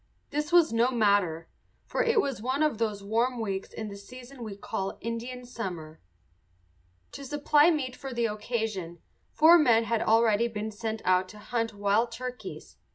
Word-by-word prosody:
This 300 +1 -2
was 345 -7 +5
no 235 +2 +3
matter, 200 -9 +1 0.4
for - - -1
it 460 -1 +3
was 275 - -1
one 260 +5 0
of 300 -8 0
those 210 -3 -2
warm 235 +4 0
weeks 195 -3 -3
in 220 - -6
the 200 - -7
season 250 +5 -12
we 215 -3 -6
call 195 -1 -4
Indian 240 +2 -5
summer. 175 -10 -7 1.1
To 280 - -9
supply 295 +3 +3
meat 270 -6 -1
for 270 -1 -7
the 235 -1 0
occasion 210 -5 -3 0.3
four 330 +3 +6
men 235 -6 +4
had 230 0 0
already 225 0 +3
been 220 -1 -5
sent 220 +1 -5
out 185 0 +2
to 210 - -12
hunt 225 +1 -3
wild 205 +4 +1
turkeys. 250 +1 -8
230 Hz, 165 wpm, -28 LUFS, 205-255 Hz, 1.1 s, four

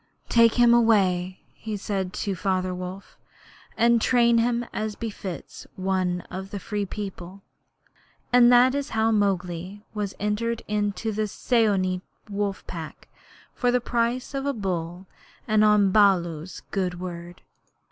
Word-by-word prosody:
'Take 230 -1 +5
him 240 -1 +5
away,' 190 -6 +2
he 215 -1 -5
said 190 -2 -3
to 200 0 -3
Father 185 0 -1
Wolf, 185 +2 -8 0.6
'and 235 0 +4
train 235 -1 +4
him 240 +1 +1
as 215 -1 -3
befits 200 -6 -7
one 185 -1 -1
of 190 +2 -8
the 205 - -5
Free 205 +1 -3
People.' 195 -2 -7 0.9
And 245 -1 +7
that 250 +1 +6
is 285 0 -2
how 220 +1 +3
Mowgli 195 -1 -1
was 205 -2 -3
entered 220 +3 -1
into 210 +1 -1
the 215 0 -1
Seeonee 200 -5 +1 0.3
wolf 200 -1 -2
pack 165 -3 -8 0.4
for 245 - 0
the 250 0 +3
price 240 +2 -1
of 275 0 -2
a 280 - +1
bull 180 -4 -4 0.4
and 215 -1 +3
on 210 -2 +4
Baloo's 180 -5 +2
good 180 -3 -2
word. 175 -1 -8
205 Hz, 135 wpm, -25 LUFS, 185-230 Hz, 0.9 s, And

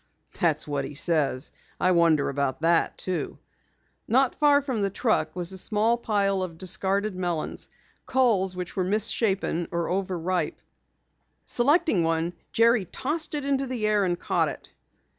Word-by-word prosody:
"That's 160 -5 +1
what 145 -2 -2
he 140 +2 -7
says. 145 -5 +1 0.3
I 185 - +3
wonder 165 -4 +3
about 140 0 -2
that 165 0 +2
too." 175 -6 -3 0.7
Not 260 +3 +3
far 290 -1 +4
from 255 -6 -2
the 200 - +1
truck 220 +1 0
was 175 0 -2
a 190 - -2
small 220 +4 +1
pile 200 -4 0
of 175 -3 -5
discarded 195 +2 0
melons, 175 -4 -3 0.4
culls 215 -8 +2
which 180 -1 -6
were 185 - 0
misshapen 195 -3 0
or 170 -1 -2
over 185 -1 -1
ripe. 170 -1 -1 0.9
Selecting 275 - +2
one, 165 +1 0 0.2
Jerry 230 -2 +3
tossed 300 - -3
it 290 -2 -3
into 275 -1 0
the 245 -4 -2
air 210 -1 +3
and 175 -2 -1
caught - - +1
it. - - -10
190 Hz, 155 wpm, -26 LUFS, 170-230 Hz, 0.9 s, far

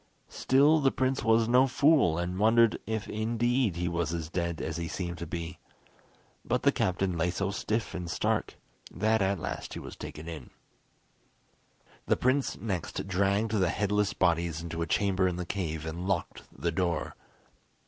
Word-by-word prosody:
Still, 145 +4 +4
the 135 -2 +4
prince 130 +1 0
was 115 0 +4
no 125 +3 +5
fool, 140 - +4
and 90 +2 -2
wondered 115 +1 +4
if 110 -1 -2
indeed 115 0 0
he 85 0 -2
was 85 -1 -1
as 80 -1 -5
dead 85 -2 -2
as 80 0 -3
he 85 -1 -3
seemed 85 0 -4
to 85 - -5
be; 85 0 -5 0.8
but - - -1
the - - +5
captain 90 0 0
lay 85 +1 +1
so 95 +3 -1
stiff 110 +3 -2
and 90 -2 -5
stark, - - -1 0.3
that 110 0 +1
at 100 +1 +1
last - - -5
he - - -4
was - - -9
taken 75 +2 -8
in. 80 -7 -7 1.6
The - - +3
prince 130 +2 +1
next 95 -3 -3
dragged 100 +3 +1
the 95 -5 +2
headless 105 +1 0
bodies 85 -3 +1
into 85 0 -5
a 85 - -1
chamber 95 +4 +2
in 90 - -1
the 90 0 -4
cave, 80 -5 -3
and 85 +3 -4
locked 95 -4 -2
the 85 - -2
door. 85 -2 -1
95 Hz, 170 wpm, -29 LUFS, 85-110 Hz, 1.6 s, no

